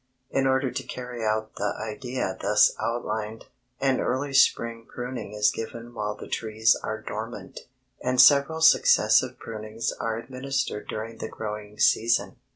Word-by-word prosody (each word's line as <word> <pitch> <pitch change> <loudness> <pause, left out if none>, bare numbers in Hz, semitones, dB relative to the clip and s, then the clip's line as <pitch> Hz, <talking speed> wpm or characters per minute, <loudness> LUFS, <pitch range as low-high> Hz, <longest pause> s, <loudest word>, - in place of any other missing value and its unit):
In 135 0 +2
order 130 -1 +1
to 125 - -3
carry 125 -2 -7
out 110 0 -1
the 105 - -1
idea 115 -2 -3
thus 105 0 +4
outlined, 110 -2 -3 0.3
an 135 -1 +2
early 135 +2 -1
spring 115 -4 +2
pruning 125 -4 -6
is 105 0 +3
given 115 +1 -7
while 105 -2 -3
the - - -10
trees 110 0 +2
are - - -3
dormant, - - -7 0.3
and 125 0 0
several 140 +4 +6
successive 160 - +5
prunings 110 0 -4
are 115 -1 -3
administered 130 -2 -3
during 115 +1 -6
the 110 - -4
growing 105 -1 -6
season. 120 +4 +2
115 Hz, 145 wpm, -26 LUFS, 110-130 Hz, 0.3 s, several